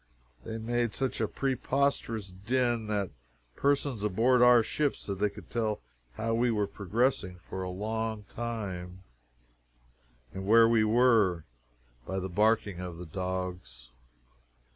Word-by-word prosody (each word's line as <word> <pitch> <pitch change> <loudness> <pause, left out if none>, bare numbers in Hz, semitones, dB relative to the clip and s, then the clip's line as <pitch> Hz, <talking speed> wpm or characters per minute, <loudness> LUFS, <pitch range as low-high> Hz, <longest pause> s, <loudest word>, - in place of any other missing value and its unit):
They 110 - -5
made 120 0 -1
such 135 -1 -1
a - - +2
preposterous 130 -6 -1
din 120 +3 0
that 100 -3 -1 0.4
persons 140 -5 0
aboard 115 +5 +3
our 125 -1 +7
ship 145 +4 0
said 100 -2 -6
they 105 0 +2
could 100 -4 -13
tell 110 -3 -1 0.3
how 115 - -2
we 120 +2 +2
were 105 -3 +1
progressing 100 -1 -1
for 95 - -5
a 90 - -3
long 110 +3 -3
time, 95 -6 -5 1.3
and 95 0 -6
where 115 +1 +7
we 115 -1 +4
were, 110 -7 +3 0.6
by 95 - -3
the 95 0 -3
barking 105 -1 +2
of 90 -2 -6
the 90 - -7
dogs. 90 -9 -5
110 Hz, 135 wpm, -30 LUFS, 95-120 Hz, 1.3 s, our